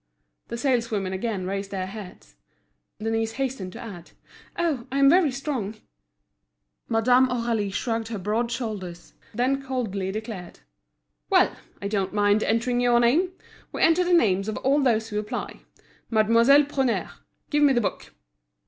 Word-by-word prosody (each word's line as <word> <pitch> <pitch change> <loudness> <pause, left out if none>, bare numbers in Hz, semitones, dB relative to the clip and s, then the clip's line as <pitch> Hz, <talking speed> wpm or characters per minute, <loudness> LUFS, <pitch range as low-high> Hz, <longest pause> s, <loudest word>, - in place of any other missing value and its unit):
The 235 - -5
saleswomen 230 -7 0
again 195 -1 -3
raised 195 +1 -3
their 190 -2 -3
heads. 195 -1 -10 0.6
Denise 225 +1 -1
hastened 260 -8 -3
to - - -9
add: 195 -7 -9 0.5
"Oh, 310 -8 -1
I'm 275 +1 +5
very 350 -3 +5
strong!" 255 -6 -3 1.1
Madame 245 +3 +4
Aurélie 230 -5 -1
shrugged 225 +2 -2
her 225 -1 -4
broad 215 +5 -1
shoulders, 210 -8 -5 0.2
then 260 +4 +1
coldly 220 -8 -3
declared: 215 -4 -7 0.7
"Well! - - +4 0.3
I - - -1
don't 200 -2 -1
mind 205 +1 +3
entering 245 +3 +1
your 240 -1 +4
name. 315 +11 +2 0.4
We - - -1
enter 330 +2 +5
the 360 - -1
names 205 - +3
of 215 - -3
all 280 +3 +2
those 225 -4 +1
who 210 -1 -2
apply. 210 +1 -5 0.5
Mademoiselle 230 +6 +5
Prunaire, 270 -4 -1 0.4
give 295 -1 +2
me 285 -2 +5
the 240 - +2
book." 205 - -4
230 Hz, 145 wpm, -25 LUFS, 205-260 Hz, 1.1 s, I'm